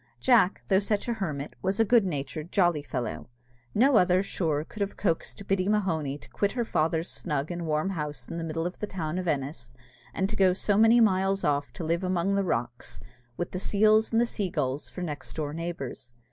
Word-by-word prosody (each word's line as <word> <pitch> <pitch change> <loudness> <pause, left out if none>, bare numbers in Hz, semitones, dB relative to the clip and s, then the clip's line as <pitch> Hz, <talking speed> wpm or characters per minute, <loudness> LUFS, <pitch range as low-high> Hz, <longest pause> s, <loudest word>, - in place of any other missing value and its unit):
Jack, 180 +9 +4
though 190 -1 +4
such 205 +2 -1
a 240 - +1
hermit, 150 -10 -4
was 190 +3 -1
a 225 - +5
good 230 -1 +4
natured, 150 +1 -4
jolly 175 -6 +3
fellow. 125 -6 -4 0.5
No 255 +3 +5
other, 180 0 +4
sure, 160 -6 -1
could 215 - -9
ever 200 - +1
have - - -21
coaxed 195 +1 -2
Biddy 195 0 +1
Mahony 165 -9 0
to - - -17
quit 200 - 0
her 240 -2 -1
father's 160 -2 0
snug 150 -1 -3
and 170 -1 -4
warm 155 +5 0
house 150 -7 -4
in 170 - -5
the - - -3
middle 165 0 -2
of 180 - -4
the 210 - -3
town 170 -2 -3
of 180 - -4
Ennis, 135 -5 -3 0.4
and 190 - 0
to 215 - -5
go 190 -3 +4
so 200 +2 +1
many 225 +3 +6
miles 195 -2 +3
off 145 -1 0
to - - -6
live 170 +3 0
among 185 +1 +1
the 200 0 +2
rocks, 120 -8 -3 0.4
with 175 - -3
the 185 - -3
seals 215 +3 +3
and 235 +1 +3
sea 205 -5 -2
gulls 140 -3 -2
for 180 - -6
next 150 -4 -6
door 150 -2 -3
neighbours. 150 -7 -6
175 Hz, 215 wpm, -28 LUFS, 150-200 Hz, 0.5 s, many